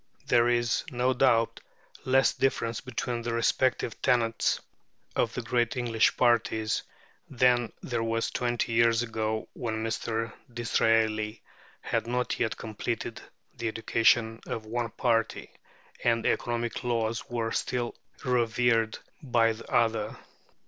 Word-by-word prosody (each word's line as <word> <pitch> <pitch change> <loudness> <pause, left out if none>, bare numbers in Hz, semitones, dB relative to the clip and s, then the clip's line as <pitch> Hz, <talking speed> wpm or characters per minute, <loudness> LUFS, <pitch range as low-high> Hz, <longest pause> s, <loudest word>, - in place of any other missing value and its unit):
There 120 0 +4
is, 120 0 +1
no 125 -1 +1
doubt, 120 -3 +3 0.5
less 130 -1 +4
difference 120 -4 0
between 120 -1 -3
the 115 0 -2
respective 120 0 +1
tenets 115 -2 +2 0.6
of 115 -2 0
the 125 - -3
great 120 +1 0
English 115 -3 +2
parties 115 -3 +2 0.5
than 125 -2 +3
there 120 -3 -2
was 115 0 -1
twenty 120 -1 -1
years 115 0 +4
ago, 110 -1 -2
when 110 -3 -3
Mr. 115 0 -2 0.2
Disraeli 115 -2 +1 0.4
had - - -1
not 125 +1 -1
yet 110 -2 0
completed 115 +1 -4 0.3
the 120 -2 -3
education 115 0 +2
of 110 - -4
one 120 +1 -2
party, 115 0 0 0.5
and 115 -1 +2
economic 120 +1 -1
laws 115 -2 -1
were 115 -2 -2
still 120 0 -1 0.3
revered 120 -2 +2 0.2
by 120 -5 +3
the 110 - -12
other. 115 -2 +1
115 Hz, 120 wpm, -28 LUFS, 115-120 Hz, 0.6 s, There